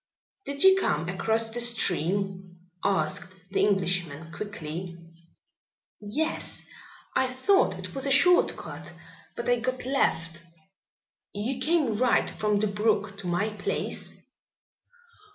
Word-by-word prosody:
"Did 280 0 0
you 385 0 +7
come 155 - 0
across 225 +5 +3
the 240 - -3
stream?" 190 -5 +1 0.3
asked 180 -2 0 0.2
the - - 0
Englishman 180 -5 0
quickly. 170 -3 -6 1.0
"Yes. 250 +10 -4 0.5
I 260 -1 +2
thought 385 +10 +2
it - - -8
was 270 0 0
a - - 0
short 355 +6 +4
cut, - - -9 0.4
but - - -5
I 245 -1 +3
got 255 +1 -3
lost." 165 -11 0 0.9
"You 240 +6 -2
came 300 -7 +1
right 250 +1 +3
from 210 -1 0
the 210 - +1
brook 210 0 0
to 190 - -6
my 175 +5 0
place?" 210 -2 -4
210 Hz, 120 wpm, -27 LUFS, 180-255 Hz, 1.0 s, you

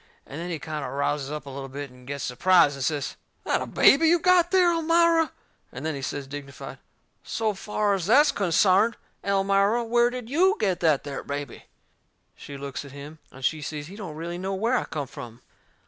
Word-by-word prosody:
And 145 +4 -8
then 175 - -5
he 170 - -2
kind 155 0 -5
o' - - -4
rouses 140 0 -1
up 150 -1 -5
a - - -8
little 135 0 -7
bit, 140 0 -7
and 125 0 -17
gets 140 0 -4
surprised 160 +4 +4
and 135 - -5
says: 145 -1 -2 0.3
"That - - 0
a - - -4
BABY 320 +4 +5
you 345 +2 +5
got 350 0 +4
there, 365 -2 +4
Elmira?" 330 0 +3 0.4
And - - -7
then 160 - -1
he 140 - -6
says, 140 +1 -4
dignified: 140 -1 -9 0.4
"So 220 -2 -1
fur 210 +1 -1
as 190 -3 -2
that's 290 +7 +6
consarned, 195 +4 +3 0.3
Elmira, 200 +3 +2
where 240 +1 +3
did 250 -2 -6
YOU 365 - +3
get 185 -3 0
that 155 -5 +2
there 140 -2 -6
baby?" 140 -2 -6 0.7
She 140 - -9
looks 140 0 -6
at 140 -1 -12
him, 145 +2 -10
and 130 0 -7
she 155 +2 0
sees 145 0 -5
he 185 +6 -11
don't 185 -8 -7
really 170 +2 -5
know 190 +1 -3
where 230 +6 +1
I - - 0
come 150 -3 -4
from. 120 -3 -10
170 Hz, 210 wpm, -25 LUFS, 140-225 Hz, 0.7 s, that's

